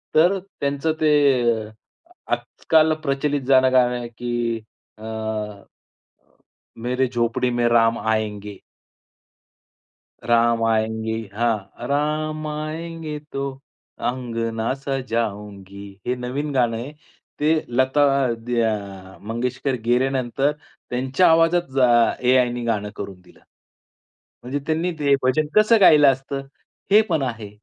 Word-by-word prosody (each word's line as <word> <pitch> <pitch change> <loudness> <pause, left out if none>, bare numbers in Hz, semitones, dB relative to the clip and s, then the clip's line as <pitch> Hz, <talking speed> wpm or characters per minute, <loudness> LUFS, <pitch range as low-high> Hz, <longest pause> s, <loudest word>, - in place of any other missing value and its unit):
तर 175 +5 +5
त्यांचं 155 -4 -2
ते 130 -8 +3 0.6
आजकाल 160 -1 +2
प्रचलित 140 0 0
जाणं 130 -1 +5
गाणं 125 -1 +4
आहे, 120 - -6
की 120 -1 -3 0.4
अ, 110 - -14 1.8
मेरे 125 +1 0
झोपडी 120 +1 0
में 120 0 +1
राम 115 -1 +3
आएंगे. 105 -2 -2 1.7
राम 115 -1 +2
आयेंगे 110 0 0 0.2
हां, 115 +1 -2
राम 155 +2 -1
आयेंगे, 155 0 -5
तो 140 -2 -5 0.6
अंगना 115 -1 -2
सजाऊंगी 105 -7 -4 0.2
हे 125 - +1
नवीन 130 +4 -4
गाणं 120 -3 +1
आहे. 130 +6 -7 0.5
ते 155 +2 +3 0.2
लता 130 +4 +2 0.4
द्या 100 -5 -2
मंगेशकर 125 +5 -2
गेल्यानंतर 130 +2 +1 0.4
त्यांच्या 130 +8 +2
आवाजात 165 +2 +4
जा 130 -2 +5 0.4
एआयने 125 -1 +3
गाणं 105 -3 -1
करून 95 -2 -7
दिलं, 90 - -21 1.0
म्हणजे 135 +4 -3
त्यांनी 165 +3 0
ते 140 -1 +4
भजन 150 +4 +2
कसं 215 +1 +5
गायला 150 -6 +7
असतं? 135 +1 -5 0.5
हे 210 - +8
पण 160 -4 +1
आहे, 115 -5 -4
125 Hz, 105 wpm, -22 LUFS, 115-145 Hz, 1.8 s, हे